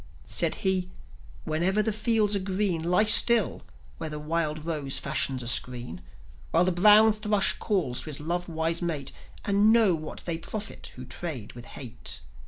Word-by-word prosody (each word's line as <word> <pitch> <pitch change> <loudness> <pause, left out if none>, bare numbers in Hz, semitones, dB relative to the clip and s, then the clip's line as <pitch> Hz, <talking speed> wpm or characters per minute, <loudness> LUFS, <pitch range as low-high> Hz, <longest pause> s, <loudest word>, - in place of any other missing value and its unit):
Said - - +3
he: 185 -1 0 0.5
"Whenever 185 +7 0
the 220 0 -1
fields 215 -1 +1
are - - 0
green, 190 -3 -2
Lie 180 +5 +2
still, 220 0 +6 0.4
where 160 - -5
the 150 - -6
wild 155 0 -3
rose 150 -5 -2
fashions 135 -2 -2
a - - -7
screen, 120 -7 -1 0.5
While 170 - +2
the 185 - +1
brown 210 +4 +5
thrush 210 -2 0
calls 175 - -2
to - - -11
his 155 -2 -7
love 175 +4 -4
wise 165 +1 -2
mate, 155 -6 -3 0.3
And 205 +2 +3
know 225 -5 +4
what 155 -1 -7
they 165 -2 -3
profit 215 +5 -7
who 125 - -10
trade 130 -3 -6
with 120 0 -11
Hate." 125 -4 -7
170 Hz, 170 wpm, -26 LUFS, 150-205 Hz, 0.5 s, still